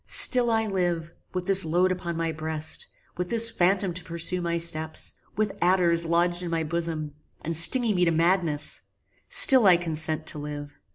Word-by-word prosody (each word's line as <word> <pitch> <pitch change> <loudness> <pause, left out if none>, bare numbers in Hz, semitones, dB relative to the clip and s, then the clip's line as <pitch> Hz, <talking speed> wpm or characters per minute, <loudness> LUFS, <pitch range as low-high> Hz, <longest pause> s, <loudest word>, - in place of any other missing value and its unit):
Still 245 -2 +5
I 225 -1 0
live: 175 -5 -3 0.2
with 180 -1 -5
this 195 0 +5
load 175 +3 0
upon 170 -2 -5
my 165 -1 -3
breast; 155 0 -4 0.3
with 180 0 -5
this 230 0 +1
phantom 190 -2 0
to 180 - -5
pursue 170 +1 -3
my 170 -1 -3
steps; 160 -1 -2 0.2
with 215 -1 -2
adders 175 -2 +1
lodged 175 +1 -1
in 175 - -6
my 165 -1 -2
bosom, 160 -2 -4 0.3
and 165 +1 -3
stinging 225 - +6
me 180 -2 0
to 165 - +1
madness: 165 -3 -1 0.5
still 260 -7 +7
I 180 -2 +5
consent 160 -2 -4
to 155 - -3
live! 145 0 -8
170 Hz, 175 wpm, -24 LUFS, 160-185 Hz, 0.5 s, still